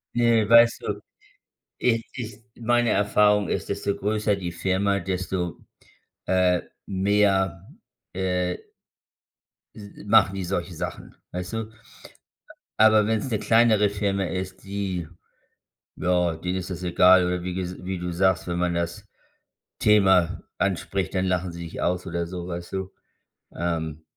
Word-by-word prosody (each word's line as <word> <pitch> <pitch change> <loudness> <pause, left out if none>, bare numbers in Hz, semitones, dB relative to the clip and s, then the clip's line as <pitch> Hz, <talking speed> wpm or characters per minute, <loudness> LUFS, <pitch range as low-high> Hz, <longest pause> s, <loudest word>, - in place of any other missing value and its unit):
Ne 115 -3 +3
weißt 115 +1 +6
du, - - -3 0.8
ich 115 -2 +1
ich 115 -4 -7
meine 120 0 +1
Erfahrung 105 -1 +3
ist, - - -2
desto 100 0 -1
größer 105 0 0
die 90 -3 -5
Firma, 95 +3 0
desto, 90 -1 -3 0.7
äh, 90 -1 +3 0.3
mehr 95 -2 +1 0.5
äh 90 -1 -1 1.2
s 100 -1 -10 0.2
machen 100 -2 +4
die 95 - -3
solche 90 0 -3
Sachen, - - -6 0.2
weißt 90 +2 -5
du? 110 -1 -4 1.1
Aber 110 -1 +5
wenn's 110 +4 0
'ne 110 - 0
kleinere 115 -2 +4
Firma 100 -1 -1
ist, 95 +1 -5
die 95 -4 -3 0.9
ja, 90 -2 +1
denen 90 +3 -3
ist 95 0 -5
das 90 -1 -5
egal 90 +1 +5
oder 90 0 -2
wie 90 +1 -4
ges 90 -1 -5
wie 95 0 -3
du 90 0 -4
sagst: 95 0 +1
Wenn 85 0 -2
man 90 0 +1
das 85 0 -3 0.7
Thema 95 -5 +4 0.2
anspricht, 95 0 -1
dann 95 0 +1
lachen 90 -1 0
sie 85 0 -7
dich 85 - -7
aus 90 0 -1
oder 85 0 -2
so, 90 0 -6
weißt 85 -1 -6
du? 95 0 -4 0.6
Ähm 80 -2 -3
95 Hz, 140 wpm, -25 LUFS, 90-105 Hz, 1.2 s, weißt